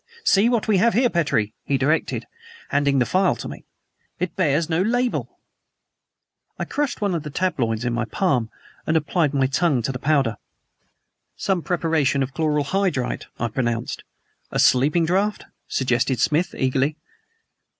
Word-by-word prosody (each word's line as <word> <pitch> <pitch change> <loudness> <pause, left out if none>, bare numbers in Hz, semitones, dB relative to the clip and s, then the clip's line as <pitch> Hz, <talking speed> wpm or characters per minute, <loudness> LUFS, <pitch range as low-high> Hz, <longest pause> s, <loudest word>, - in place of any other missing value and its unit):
"See 215 - +4
what 235 -3 0
we 210 -3 +3
have 230 +3 +3
here, 245 +1 +3
Petrie!" 115 - 0
he 140 - 0
directed, 145 +5 0 0.4
handing 140 -1 +2
the 125 - +3
phial 185 +8 +2
to - - -7
me. - - -9 0.5
"It 180 -2 -3
bears 155 -3 +1
no 165 +1 +1
label." 245 +4 -1 1.2
I - - -3
crushed 290 -5 -2
one 200 -3 +1
of 170 - -1
the 150 - -7
tabloids 130 -9 -1
in 120 - 0
my 120 -1 -1
palm 125 - 0 0.4
and 160 - +3
applied 155 0 +1
my 135 -2 +2
tongue 140 -2 +1
to 125 - -1
the 125 - -5
powder. 135 -7 +1 1.0
"Some 190 -3 0
preparation 160 -6 +1
of 135 +1 -5
chloral 150 -2 +1
hydrate," 170 -5 -1
I 120 - 0
pronounced. 120 0 -2 0.5
"A - - -3
sleeping 150 +6 +4
draught?" 195 +5 0 0.2
suggested 125 -1 0
Smith 165 +6 +1
eagerly. 135 +3 0
150 Hz, 155 wpm, -22 LUFS, 130-185 Hz, 1.2 s, See